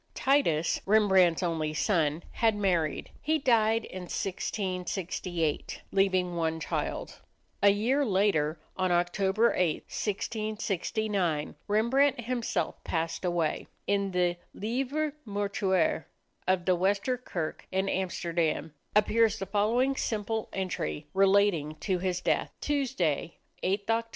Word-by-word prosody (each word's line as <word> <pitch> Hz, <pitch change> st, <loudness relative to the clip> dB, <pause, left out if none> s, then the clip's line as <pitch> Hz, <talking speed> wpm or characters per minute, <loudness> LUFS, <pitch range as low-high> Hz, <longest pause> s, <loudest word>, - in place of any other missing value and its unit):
Titus, 170 Hz, -, +2 dB
Rembrandt's 190 Hz, -5 st, +4 dB
only 160 Hz, -3 st, -1 dB
son, 160 Hz, -4 st, +1 dB
had 225 Hz, -2 st, +2 dB
married. 180 Hz, -7 st, 0 dB
He 315 Hz, +1 st, +2 dB
died 230 Hz, -5 st, +3 dB
in 185 Hz, -1 st, -7 dB
1668, 180 Hz, -4 st, -2 dB
leaving 185 Hz, -2 st, +2 dB
one 160 Hz, -1 st, 0 dB
child. -, -, -3 dB, 0.4 s
A 200 Hz, -, +7 dB
year 235 Hz, +8 st, +2 dB
later, 185 Hz, -, +2 dB, 0.2 s
on 185 Hz, -1 st, 0 dB
October 190 Hz, +6 st, +2 dB
8, 175 Hz, -4 st, +1 dB
1669, 210 Hz, -5 st, -2 dB
Rembrandt 240 Hz, +6 st, +3 dB
himself 240 Hz, 0 st, -2 dB
passed 165 Hz, +1 st, -2 dB
away. 175 Hz, -3 st, 0 dB, 0.2 s
In 200 Hz, -1 st, +1 dB
the 180 Hz, -1 st, +1 dB, 0.2 s
"Livre 270 Hz, +7 st, -1 dB
Mortuaire" 200 Hz, -5 st, 0 dB, 0.4 s
of 185 Hz, -1 st, +2 dB
the 185 Hz, -, +4 dB
Wester 200 Hz, +7 st, +1 dB
Kerk 175 Hz, -10 st, -5 dB
in 190 Hz, +1 st, 0 dB
Amsterdam 170 Hz, -5 st, -1 dB, 0.2 s
appears 220 Hz, +1 st, +4 dB
the 195 Hz, -, -4 dB
following 225 Hz, +7 st, +2 dB
simple 220 Hz, -2 st, -2 dB
entry, 170 Hz, -, -3 dB
relating 195 Hz, -6 st, +3 dB
to 185 Hz, -3 st, 0 dB
his 180 Hz, -1 st, -1 dB
death: -, -, +1 dB
"Tuesday, 210 Hz, -, -1 dB, 0.2 s
8th 200 Hz, +2 st, 0 dB
Oct. 225 Hz, +1 st, +1 dB
195 Hz, 115 wpm, -29 LUFS, 175-220 Hz, 0.4 s, A